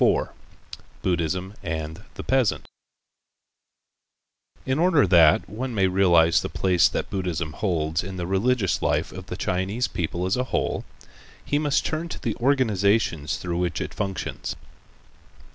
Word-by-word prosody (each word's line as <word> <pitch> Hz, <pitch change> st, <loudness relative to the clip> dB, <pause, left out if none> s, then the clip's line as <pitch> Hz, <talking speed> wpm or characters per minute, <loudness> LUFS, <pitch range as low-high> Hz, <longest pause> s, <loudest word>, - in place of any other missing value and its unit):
IV -, -, +3 dB, 0.7 s
BUDDHISM 90 Hz, +2 st, -1 dB
AND 80 Hz, +1 st, -5 dB
THE -, -, -6 dB
PEASANT 130 Hz, -5 st, +1 dB, 2.0 s
In 130 Hz, +3 st, 0 dB
order 165 Hz, -, +4 dB
that, 85 Hz, -4 st, +5 dB
one 120 Hz, +5 st, -5 dB
may 95 Hz, -2 st, +3 dB
realize 90 Hz, -3 st, +4 dB
the -, -, -4 dB
place 90 Hz, -2 st, +3 dB
that -, -, -3 dB
Buddhism 85 Hz, -5 st, -2 dB
holds 80 Hz, -4 st, -1 dB
in 95 Hz, +1 st, -6 dB
the 90 Hz, -, -3 dB
religious 95 Hz, +3 st, +1 dB
life 75 Hz, +3 st, 0 dB
of 95 Hz, 0 st, -9 dB
the 90 Hz, -, -5 dB
Chinese 95 Hz, +6 st, -1 dB
people 85 Hz, +1 st, -3 dB
as 95 Hz, -, +1 dB
a 125 Hz, -, 0 dB
whole, -, -, -2 dB, 0.6 s
he 145 Hz, -, +1 dB
must 150 Hz, -2 st, +1 dB
turn 160 Hz, +2 st, -2 dB
to -, -, -6 dB
the -, -, -2 dB
organizations 105 Hz, -, +1 dB
through 85 Hz, -1 st, -3 dB
which 90 Hz, -1 st, -1 dB
it -, -, -4 dB
functions. 95 Hz, -2 st, -4 dB
95 Hz, 145 wpm, -24 LUFS, 85-115 Hz, 2.0 s, that